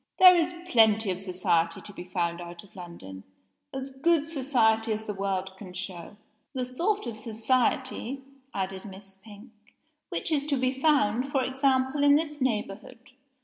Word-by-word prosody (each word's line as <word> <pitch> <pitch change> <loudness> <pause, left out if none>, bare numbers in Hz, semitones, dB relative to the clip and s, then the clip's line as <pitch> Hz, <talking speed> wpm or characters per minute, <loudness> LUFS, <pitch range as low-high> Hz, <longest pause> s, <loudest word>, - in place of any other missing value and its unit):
"There 365 -1 +9
is 340 0 +2 0.2
plenty 220 - +4
of 180 - -3
society 180 -3 0
to 205 - -8
be 180 - -8
found 175 -1 -2
out 175 0 -9
of 200 - -20
London 170 - -10 0.5
as 270 0 -5
good 300 +3 +2
society 235 -7 +2
as 215 +1 -5
the 210 - -3
world 195 -1 -3
can 190 -3 -10
show." 185 +1 -7 0.4
"The 255 -1 -1
sort 350 +12 -1
of 230 -2 -6
society," 255 +3 0 0.3
added 190 0 -4
Miss 195 -1 -11
Pink, 210 +4 -14 0.6
"which - - -2
is 290 -1 +1
to 285 -2 +1
be 255 0 +1
found, 265 -3 +2
for 270 -2 +1
example, 265 +1 +1
in 285 0 +7
this 300 -1 -1
neighborhood. 235 +1 -3
225 Hz, 160 wpm, -27 LUFS, 190-270 Hz, 0.6 s, There